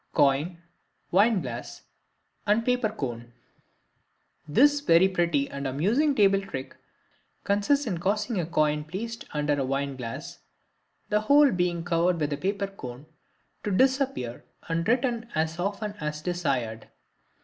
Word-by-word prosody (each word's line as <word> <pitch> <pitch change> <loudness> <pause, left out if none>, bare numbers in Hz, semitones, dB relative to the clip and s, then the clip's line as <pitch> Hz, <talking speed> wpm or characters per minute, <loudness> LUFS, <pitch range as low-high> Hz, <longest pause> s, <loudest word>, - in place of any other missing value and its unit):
Coin, 145 +5 +2 0.5
Wine 205 +2 +4
glass, - - -7 0.6
and 215 +3 +3
Paper 250 -3 +2
Cone.—This 130 - -3
very 190 - +5
pretty 170 -7 +1
and 140 0 -5
amusing 220 - +1
table 195 -3 +4
trick 135 -9 -7 0.7
consists 205 +9 +2
in 185 -7 -2
causing 210 +3 0
a 165 - -2
coin 150 -2 +1
placed 220 +9 -6
under 150 -1 0
a - - +1
wine 135 +1 -2
glass, 115 -3 -7 0.7
the 210 0 +2
whole 285 +5 +5
being 175 -2 0
covered 175 0 +1
with 150 -1 0
a - - -2
paper 200 +5 -1
cone, 140 -9 -9 0.6
to - - -2
disappear 260 - +1 0.2
and 165 0 -1
return 240 -1 0
as 160 +2 -1
often 200 +3 -2
as 150 0 -4
desired. 135 -11 -2
175 Hz, 130 wpm, -27 LUFS, 145-215 Hz, 0.7 s, very